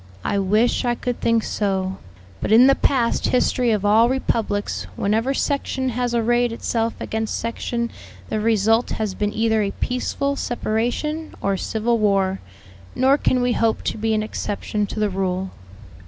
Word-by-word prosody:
"I 200 - 0
wish 210 +7 +2
I 240 -1 +1
could 245 0 -4
think 230 -1 +2
so, 190 -2 -1 0.4
but - - -2
in 230 +3 +8
the 275 - +6
past 255 -4 +1
history 250 -1 +2
of 210 -3 +1
all 220 +3 +5
republics 225 -5 -1
whenever 225 +7 0
section 265 -2 -1
has 245 0 -1
arrayed 240 +1 +2
itself 230 0 -1
against 220 0 -2
section 235 +1 -3 0.4
the 215 - -2
result 225 +1 +2
has 215 -3 -2
been 210 +2 -1
either 220 0 +1
a 200 - 0
peaceful 280 +5 -2
separation, 245 +7 -2
or 195 0 0
civil 225 +4 -1
war; 195 -2 +2 0.6
nor 265 +2 +4
can 255 -3 +1
we 245 - +2
hope 225 -1 +1
to - - -2
be 220 0 +1
an 215 - 0
exception 210 -1 -3
to 215 - -5
the 210 -1 +1
rule." 185 0 -2
225 Hz, 160 wpm, -22 LUFS, 210-245 Hz, 0.6 s, in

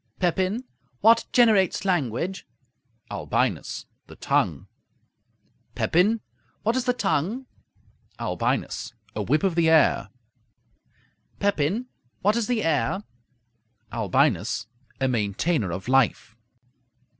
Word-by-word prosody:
Pepin 185 +6 0 0.4
What 230 +1 +5
generates 215 -6 +4
language? 175 - -1 0.6
Albinus - - -1 0.2
The - - -12
tongue. - - 0 1.1
Pepin 205 +7 +2 0.4
What 225 +3 +1
is 255 -1 0
the 250 - +2
tongue? 215 - -1 0.7
Albinus - - -2 0.2
A - - -1
whip 155 - +1
of 190 -3 +2
the 165 -1 +3
air. 160 -2 +4 1.3
Pepin 200 - 0 0.4
What 210 +3 +3
is 235 -2 0
the 240 -3 0
air? 165 +5 0 0.9
Albinus 115 - +1 0.3
A 135 - +2
maintainer 110 - 0
of 95 +5 -5
life. 130 -4 +2
175 Hz, 100 wpm, -25 LUFS, 135-215 Hz, 1.3 s, What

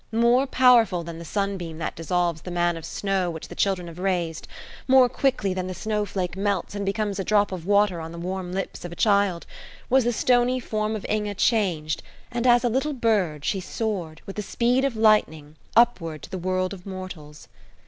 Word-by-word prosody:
More 240 +4 +3
powerful 235 -9 +4
than 165 0 -7
the - - -7
sunbeam 190 -4 -3
that 165 - -4
dissolves 170 -1 -1
the 180 - -8
man 175 -1 +1
of 165 - -7
snow 195 -3 -1
which 160 -2 -7
the - - -7
children 190 -3 0
have 170 +1 -10
raised, 175 -4 -2 0.4
more 260 -1 +6
quickly 245 -6 0
than 185 0 -3
the 185 - -5
snowflake 200 -5 -2
melts 200 -1 -1
and 205 0 -3
becomes 200 0 -2
a - - 0
drop 205 0 +2
of 180 -2 -6
water 200 -4 +3
on 160 0 -7
the 170 - -9
warm 180 +1 -4
lips 195 +1 -4
of 175 - -6
a - - -7
child, 200 -5 +2 0.5
was 265 0 +5
the 240 - +1
stony 245 +2 +2
form 215 -2 -2
of 210 - -6
Inge 210 -2 -2
changed, 170 -10 +1 0.3
and 240 +1 -1
as 240 0 +5
a - - +3
little 270 +6 0
bird 200 - 0
she 195 - 0
soared, 185 -5 -4
with 195 - -8
the - - -1
speed 245 +5 +1
of 270 -4 -1
lightning, 185 -9 +2 0.2
upward 170 - +2
to - - -10
the 185 - -4
world 185 +1 -1
of 185 -2 -10
mortals. 180 -6 -8
195 Hz, 200 wpm, -24 LUFS, 175-220 Hz, 0.5 s, more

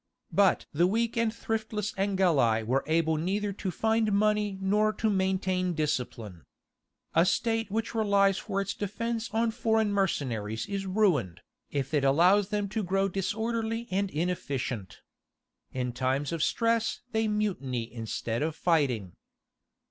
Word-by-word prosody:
But 200 -1 +3
the 170 +4 +3
weak 225 +4 0
and 230 -1 +1
thriftless 220 -2 -3
Angeli 175 - +2
were 130 +5 0
able 160 0 +2
neither 200 +5 -1
to 195 0 -4
find 220 +3 +1
money 210 -1 +1
nor 210 +3 +2
to 215 +1 0
maintain 190 -1 0
discipline. 120 - -3 0.7
A 165 - +5
state 225 +3 0
which 225 +3 -2
relies 200 -3 +3
for 200 -2 -3
its 200 0 -2
defence 225 +3 -3
on 225 +1 +1
foreign 220 -2 +1
mercenaries 115 - -1
is 195 -1 -4
ruined, 180 - +1 0.3
if 140 0 -3
it 145 -2 +2
allows 180 +9 +4
them 205 -1 -1
to 220 +2 -2
grow 195 +1 +1
disorderly 225 +4 -2
and 195 +1 0
inefficient. 140 - -3 0.7
In 125 -1 -3
times 130 +4 -1
of 165 -2 -2
stress 230 +4 +1
they 220 -1 +1
mutiny 185 - -1
instead 115 0 -3
of 155 0 -1
fighting. 135 - +1
195 Hz, 140 wpm, -28 LUFS, 145-215 Hz, 0.7 s, A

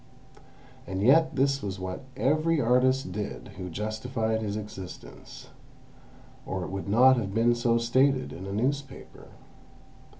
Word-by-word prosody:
And 95 +1 -3
yet 160 +6 +4
this 135 +1 +1
was 95 -1 -5
what 95 +3 -5 0.2
every 155 +4 +2
artist 125 -2 +2
did 105 +2 -5
who 90 0 -6
justified 110 +4 -2
his 105 -1 -3
existence—or 95 - -10
it - - -6
would 95 0 -5
not 130 +5 +6
have 100 -4 -3
been 115 +1 +4
so 120 0 +1
stated 130 +3 +2
in 95 +3 -8
a - - -5
newspaper. 135 +7 -4
115 Hz, 130 wpm, -27 LUFS, 100-130 Hz, 0.2 s, not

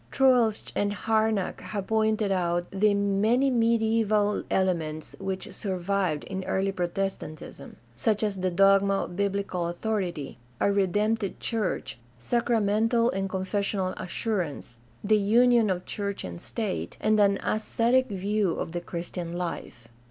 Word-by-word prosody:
— - - -30
Troeltsch 250 -5 +3
and 205 0 0
Harnack 220 -2 0
have 195 +1 -4
pointed 220 -1 +1
out 175 -2 0
the 205 +1 +3
many 210 +7 +2
mediaeval 225 -3 +2
elements 160 -5 -1
which 190 -1 -4
survived 185 -5 -1
in 190 0 -5
early 195 +1 0
Protes 190 +1 -2
tantism, 150 -2 -10 0.2
such 210 - 0
as 205 -3 -1
the 185 0 +1
dogma 195 +2 +4
of 175 - -7
biblical 200 -3 -1
authority, 175 - -3 0.2
a 200 - +3
redemptive 205 +2 0
church, 215 - -2 0.2
sacramental 225 - +1
and 195 0 -2
confessional 190 0 -1
assurance, 170 - -3 0.2
the 215 +1 +3
union 230 +2 +4
of 185 -1 -2
church 200 -1 -4
and 85 -1 -7
state, 215 -5 -4
and 215 0 +2
an 200 -1 +4
ascetic 235 +4 +1
view 200 -2 0
of - - -4
the 175 +1 -3
Christian 170 0 -5
life. 170 -9 -5
200 Hz, 135 wpm, -27 LUFS, 185-220 Hz, 0.2 s, dogma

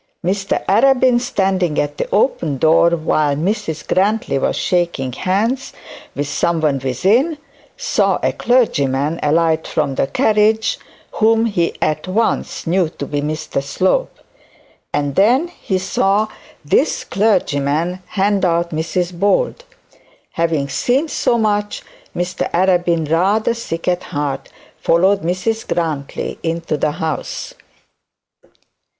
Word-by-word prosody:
Mr 195 +2 -1
Arabin 250 +3 +4
standing 190 -8 0
at 145 0 -2
the - - -2
open 170 - +1
door, 160 +4 +4
while 155 -3 +1
Mrs 165 -1 -2
Grantly 200 -6 +1
was - - 0
shaking 170 -8 -1
hands 215 - -1 0.4
with 145 0 -2
someone 155 -2 0
within, 200 - +1 0.4
saw - - +1
a - - +2
clergyman 150 - +1
alight 160 +1 +1
from 145 -3 -1
the 135 - 0
carriage 220 - +2 0.3
whom 225 +1 +3
he 180 -7 0
at 155 +2 -1
once 220 +5 -1
knew 175 0 +1
to - - -7
be 145 -1 -2
Mr 155 -1 -3
Slope, 190 - 0 0.7
and 145 -1 -1
then 250 - +3 0.2
she 190 -5 +2
saw 195 +3 +1 0.4
this 265 - +1
clergyman 175 -4 0
hand 200 0 0
out 170 -1 +1
Mrs 170 +3 -2
Bold. 205 - 0 0.7
Having 160 -4 -1
seen 265 - 0
so 235 - +1
much, 210 -2 -1 0.3
Mr 175 +1 -2
Arabin, 175 -3 +2
rather 195 +8 +2
sick 165 -8 -5
at 180 0 0
heart, 145 -2 -3 0.3
followed 190 +4 +3
Mrs 185 +6 -2
Grantly 155 -5 -3
into 165 -1 -2
the 150 0 0
house. 160 -1 -4
175 Hz, 120 wpm, -18 LUFS, 155-210 Hz, 0.7 s, Arabin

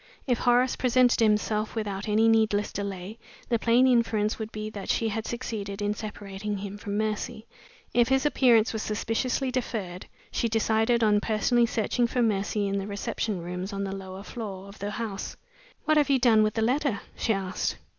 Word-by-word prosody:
If 245 -4 +1
Horace 245 +1 +3
presented 250 0 +3
himself 215 0 +1
without 205 -1 -3
any 220 +2 +4
needless 220 -2 +2
delay, 200 +2 -5 0.3
the 235 -2 +2
plain 235 +3 +4
inference 230 -4 +2
would 220 -1 -4
he 215 0 -5
that 200 -2 -7
she 225 - +1
had 220 +1 -3
succeeded 215 -5 -4
in 205 0 0
separating 210 -1 -5
him 200 +1 -6
from 205 -1 -3
Mercy. 215 +1 -2 0.5
If 240 -1 +4
his 265 +2 +2
appearance 245 -6 +4
was 220 - -2
suspiciously 230 +5 -1
deferred, 210 -8 -4 0.2
she 235 - 0
decided 225 +1 +2
on 210 -1 +4
personally 230 +3 +2
searching 235 +1 0
for 245 +1 0
Mercy 205 -1 0
in 200 0 -1
the 195 - -5
reception 200 -1 -3
rooms 180 +3 -5
on 200 0 -2
the 195 0 -3
lower 190 0 -8
floor 200 -4 -7
of 200 - -13
the 200 - -3
house. 210 -2 -5 0.5
"What 310 0 +3
have 295 -1 +3
you 275 - +5
done 235 -4 +5
with 215 0 +1
the 225 - +1
letter?" 255 -2 +1
she - - 0
asked. 190 -2 -2
215 Hz, 185 wpm, -27 LUFS, 200-235 Hz, 0.5 s, you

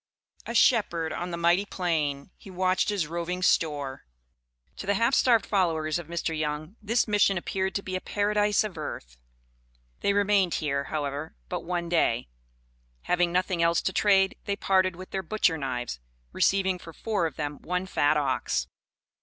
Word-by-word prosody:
"A 235 - -4
shepherd 175 -10 +3
on 175 - -4
the 170 - -4
mighty 170 +3 +3
plain 160 -6 -2
he - - -14
watched 185 +1 +1
his 200 -6 0
roving 170 +3 -3
store." 145 - 0 0.7
To - - -7
the 200 - +2
half 230 +6 +2
starved 235 -5 +4
followers 165 -5 +1
of 170 - -9
Mr. 170 -1 -2
Young, 155 +4 -3
this 230 +3 +1
Mission 205 -2 +3
appeared 190 +2 -2
to 200 - -1
be 185 - -4
a 185 - -2
"Paradise 210 0 +1
of 195 -7 -6
Earth." - - -7 0.8
They 200 - +1
remained 200 -3 +2
here, 140 -3 -1
however, 145 0 -4
but - - -3
one 175 0 -2
day. 140 - +1 0.7
Having 175 -1 +1
nothing 180 -1 0
else 170 0 +3
to 190 - -1
trade, 195 -1 +3
they 200 - -1
parted 185 -2 +2
with 185 +1 -10
their 190 - -2
butcher 185 -2 +1
knives, 125 - -4 0.3
receiving 190 -2 +2
for 165 -1 -11
four 205 -5 -1
of 150 - -9
them 145 -1 -4
one 180 +1 -2
fat 150 -5 +2
ox. 130 - 0
175 Hz, 170 wpm, -27 LUFS, 155-195 Hz, 0.8 s, starved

